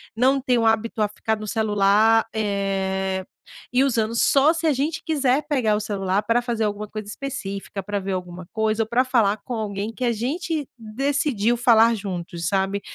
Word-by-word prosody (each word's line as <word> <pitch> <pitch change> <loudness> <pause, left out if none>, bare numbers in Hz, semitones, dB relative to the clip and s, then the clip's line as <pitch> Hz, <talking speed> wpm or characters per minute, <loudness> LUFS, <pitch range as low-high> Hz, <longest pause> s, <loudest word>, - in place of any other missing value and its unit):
não 265 +4 +3
tem 250 -2 +1
o 230 - +1
hábito 225 0 +1
a 210 - +3
ficar 220 +1 -2
no 215 0 -7
celular, 215 +1 +3
eh, 195 -2 -1 0.5
e 250 +2 +3
usando. 230 -4 0
Só 280 +6 +4
se 330 0 -3
a 315 - +4
gente 295 +4 -2
quiser 285 -2 +1
pegar 250 -8 +1
o - - 0
celular 200 -1 -1
para 230 +3 +2
fazer 235 -2 -2
alguma 210 0 -2
coisa 215 0 -7
específica, 200 -6 -5
para 205 0 -2
ver 195 0 -3
alguma 180 -1 -6
coisa, 220 0 +1
ou - - -9
para 245 +2 +3
falar 225 -5 +2
com 250 - -6
alguém 210 -1 -3
que 255 - -3
a 240 - +2
gente 295 +6 -2
decidiu 240 0 0
falar 230 -1 +5
juntos, 175 -4 -5
sabe. 195 +1 0
220 Hz, 185 wpm, -23 LUFS, 200-250 Hz, 0.5 s, falar